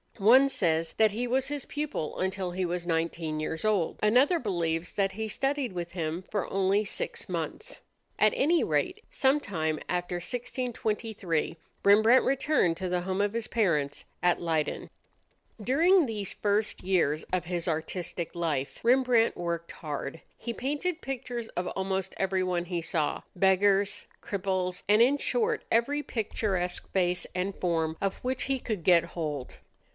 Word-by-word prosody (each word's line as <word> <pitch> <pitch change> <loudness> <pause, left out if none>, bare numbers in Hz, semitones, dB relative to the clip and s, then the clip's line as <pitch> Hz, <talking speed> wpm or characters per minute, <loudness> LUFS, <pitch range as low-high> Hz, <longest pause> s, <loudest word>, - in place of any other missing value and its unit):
One 250 +7 +6
says 165 -8 +1
that 220 -1 +4
he 235 +4 -2
was 255 +2 +1
his 290 -2 -4
pupil 295 - -4
until 190 -1 -1
he 185 +1 -1
was 175 0 -3
nineteen 165 -2 -1
years 160 +1 -3
old; 205 -6 +1
another 255 +11 +4
believes 170 - -1
that 195 -1 +1
he 220 +2 -3
studied 270 +1 -1
with 175 -1 -4
him 165 0 -3
for 205 -3 -2
only 195 +2 +2
six - - -4
months. - - -4 0.4
At 215 -1 +5
any 330 +5 +3
rate, - - 0
sometime 200 - +1
after 180 0 -1
1623 220 - -2 0.3
Rembrandt 220 +5 +6
returned 265 - +2
to 185 +1 -3
the 180 0 0
home 190 +2 -1
of 205 0 0
his 230 -1 -2
parents 155 -11 0 0.2
at 175 -1 +2
Leyden. 160 -3 -1 0.7
During 330 - +4
these 210 -5 -4
first 210 +1 0
years 165 -5 +1
of 180 -1 0
his 175 0 -2
artistic 170 +1 -3
life, 150 -5 -2
Rembrandt 245 -2 +4
worked 170 -1 -3
hard. 150 0 -5 0.2
He 235 - -4
painted 295 +8 -2
pictures 245 -3 -4
of 180 +1 -3
almost 190 0 -2
everyone 185 -2 0
he 175 -1 -2
saw 160 -2 -1
beggars, 195 +2 +3 0.2
cripples, 185 -2 -2
and 210 +2 +5
in 265 +4 +5
short 455 - 0
every 280 +6 +2
picturesque 195 -6 -2
face 180 -1 +1
and 185 +2 -2
form 160 -2 -1
of 195 -1 -1
which 255 +1 -1
he 270 -1 0
could 215 -8 -4
get 175 -2 +6
hold. 155 -6 -5
190 Hz, 150 wpm, -29 LUFS, 170-235 Hz, 0.7 s, One